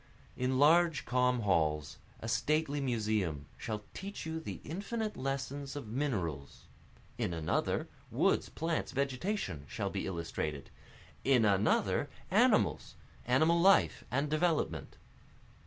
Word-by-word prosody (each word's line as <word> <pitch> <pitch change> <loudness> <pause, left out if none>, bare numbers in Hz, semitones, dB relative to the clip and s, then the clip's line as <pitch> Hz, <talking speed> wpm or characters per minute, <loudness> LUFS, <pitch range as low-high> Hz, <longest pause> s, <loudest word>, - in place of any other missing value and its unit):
In 130 +1 0
large 160 +2 +4
calm 125 0 +2
halls, 75 -7 +1 0.2
a 115 - -5
stately 145 +4 +1
museum 105 - -1
shall 110 -2 -5
teach 200 -1 -6
you 160 0 -3
the 160 - -6
infinite 210 +6 -3
lessons 135 +1 -3
of 140 -7 -6
minerals, 95 - -3 0.6
In 85 - -1
another, 80 -1 0 0.2
woods, - - +2
plants, 165 0 -2
vegetation 135 - -2
shall 105 -3 -3
be 100 - -3
illustrated 80 -5 -4 0.5
in 130 -4 +4
another 100 -1 +2 0.2
animals, - - +3 0.3
animal 155 +7 +4
life 195 +2 +4
and 140 +4 0
development. 155 +2 0
130 Hz, 115 wpm, -33 LUFS, 100-155 Hz, 0.6 s, large